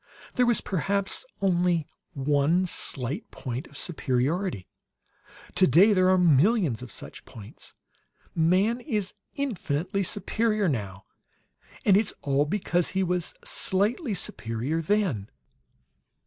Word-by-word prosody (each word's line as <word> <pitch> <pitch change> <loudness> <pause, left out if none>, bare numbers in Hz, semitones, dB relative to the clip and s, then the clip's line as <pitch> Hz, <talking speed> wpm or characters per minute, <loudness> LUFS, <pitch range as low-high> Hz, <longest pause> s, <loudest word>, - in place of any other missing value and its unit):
There 250 -2 +2
was 240 - +3
perhaps 200 - -1 0.2
only 175 -3 +2 0.3
one 145 +5 +2
slight 140 - -2
point 125 0 -6
of 140 - -13
superiority; 150 - -1 0.9
today 185 +3 +5
there 185 -1 +4
are 185 - +5
millions 170 - +3
of 125 - -9
such - - -10
points. 105 -3 -13 0.6
Man 185 +8 +2
is 210 -9 -2 0.2
infinitely 195 - -2
superior, 215 +2 0
now, 100 - -3 0.8
and 195 - +6
it's 210 +1 +2
all 140 +1 +2
because 175 0 0
he 190 0 0
was 180 -1 -1
slightly 210 - -1
superior, 120 +2 -2
then." 165 - 0
180 Hz, 110 wpm, -26 LUFS, 140-200 Hz, 0.9 s, and